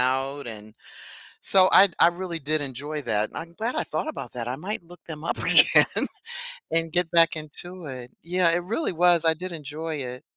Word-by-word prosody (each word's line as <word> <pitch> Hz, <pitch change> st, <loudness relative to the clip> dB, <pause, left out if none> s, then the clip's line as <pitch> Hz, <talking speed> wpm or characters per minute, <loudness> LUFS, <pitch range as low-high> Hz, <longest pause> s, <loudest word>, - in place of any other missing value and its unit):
out 135 Hz, +1 st, -1 dB
and 110 Hz, -1 st, -10 dB, 0.7 s
so 190 Hz, -1 st, +4 dB
I 200 Hz, -, +8 dB
I 165 Hz, -, +6 dB
really 175 Hz, -1 st, -6 dB
did 155 Hz, +2 st, 0 dB
enjoy 145 Hz, +2 st, -5 dB
that. 110 Hz, -2 st, 0 dB
I'm 170 Hz, +1 st, -7 dB
glad 230 Hz, +7 st, -3 dB
I -, -, -1 dB
thought -, -, -3 dB
about 205 Hz, -, -7 dB
that. 120 Hz, -1 st, -4 dB
I 130 Hz, -, -4 dB
might 185 Hz, +5 st, -5 dB
look 175 Hz, +1 st, -15 dB
them 155 Hz, -2 st, -8 dB
up 170 Hz, -, -2 dB
again -, -, +6 dB, 0.6 s
and 165 Hz, 0 st, 0 dB
get 175 Hz, -1 st, +1 dB
back 165 Hz, 0 st, +4 dB
into 160 Hz, +3 st, -8 dB
it. 125 Hz, -2 st, -8 dB
Yeah, 175 Hz, +1 st, +1 dB
it 175 Hz, +1 st, 0 dB
really 230 Hz, -, -2 dB
was. 175 Hz, -1 st, +3 dB
I 160 Hz, -, +5 dB
did 180 Hz, +3 st, -7 dB
enjoy 155 Hz, 0 st, -6 dB
it. 125 Hz, -3 st, -6 dB
160 Hz, 195 wpm, -25 LUFS, 135-175 Hz, 0.7 s, I